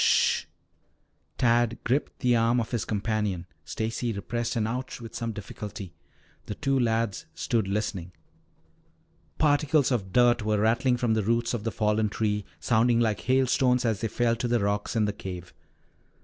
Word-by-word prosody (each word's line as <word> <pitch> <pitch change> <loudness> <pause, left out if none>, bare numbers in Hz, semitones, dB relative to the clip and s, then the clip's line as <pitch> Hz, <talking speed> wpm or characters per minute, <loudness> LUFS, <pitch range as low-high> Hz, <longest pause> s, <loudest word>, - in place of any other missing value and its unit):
"Sh - - +4
h - - +4
h!" - - -13 0.9
Tad 120 -1 +2
gripped 135 +5 -1
the 125 -2 +3
arm 115 +1 +3
of 115 - -3
his 120 -4 -1
companion. 105 -4 -1 0.2
Stacy 115 - -2
repressed 120 +4 -3
an 110 -2 +1
"ouch" 125 +4 -4
with 115 -2 -9
some 115 -1 -3
difficulty. 100 -3 -8 0.5
The 105 - -4
two 135 +3 0
lads 115 -5 0
stood 110 -4 0
listening. 95 -3 -2 1.3
Particles 145 -2 +3
of 100 -7 -1
dirt 120 +2 +4
were 105 0 +1
rattling 120 +4 +2
from 120 -2 +1
the 110 - +1
roots 115 +3 0
of 115 -2 -3
the 115 - 0
fallen 105 0 +1
tree, 105 -1 -1
sounding 120 0 +3
like 110 -3 +1
hailstones 130 -1 +2
as 110 -3 0
they 115 - 0
fell 115 +1 +1
to 120 - -1
the 120 0 +2
rocks 100 +2 -1
in 110 -2 +3
the 105 - -1
cave. 90 -3 -8
115 Hz, 170 wpm, -27 LUFS, 105-120 Hz, 1.3 s, Sh